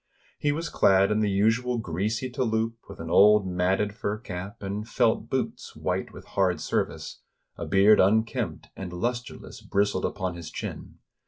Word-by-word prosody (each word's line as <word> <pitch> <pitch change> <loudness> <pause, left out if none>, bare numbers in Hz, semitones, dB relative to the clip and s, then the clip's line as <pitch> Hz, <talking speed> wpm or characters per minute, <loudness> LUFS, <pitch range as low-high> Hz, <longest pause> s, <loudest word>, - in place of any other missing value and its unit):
He 145 - +1
was 165 +3 -2
clad 95 +1 +4
in 105 - +2
the 105 -1 +2
usual 115 +5 +2
greasy 105 +5 -2
tou 125 - -4
loupe, 115 -1 0
with - - -10
an 80 0 -6
old 105 +2 +6
matted 95 +3 0
fur 105 0 -3
cap, 100 -2 -7
and 105 +3 -4
felt - - +1
boots - - -3
white - - -2
with - - -12
hard 90 -4 +1
service; - - -3 0.3
a - - -6
beard 100 +2 +5
unkempt 110 +4 +1
and 95 -2 -6
lusterless 120 +7 -4
bris 100 +1 +1
tled 95 - -2
upon 95 -1 -2
his 85 -2 -8
chin. - - -7
100 Hz, 170 wpm, -26 LUFS, 95-110 Hz, 0.3 s, old